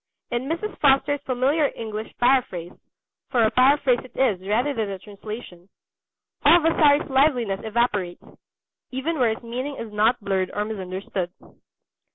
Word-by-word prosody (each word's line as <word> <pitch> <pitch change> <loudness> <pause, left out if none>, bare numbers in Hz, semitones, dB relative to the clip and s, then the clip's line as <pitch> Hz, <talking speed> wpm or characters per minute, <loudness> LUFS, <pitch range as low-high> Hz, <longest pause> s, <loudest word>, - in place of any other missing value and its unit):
In 240 +3 -2
Mrs. 380 +6 -3
Foster's 280 0 +3
familiar 270 +4 +1
English 220 -1 -6
paraphrase 240 -9 +1 0.6
for 240 -2 +2
a 220 - +3
paraphrase 255 +1 +4
it 255 - -16
is 220 -9 +2
rather 245 +8 +1
than 220 -5 -2
a 195 - -4
translation 200 -2 -10 0.7
all 320 +4 +7
Vasari's 305 -2 +3
liveliness 260 -8 +2
evaporates, 210 -5 -1 0.7
even 280 +5 -3
where 245 -3 +4
his - - -15
meaning 255 +5 -4
is 225 -4 -8
not 220 +4 +2
blurred 190 -2 -1
or 210 - -1
misunderstood. 190 -3 -4
240 Hz, 140 wpm, -24 LUFS, 210-275 Hz, 0.7 s, all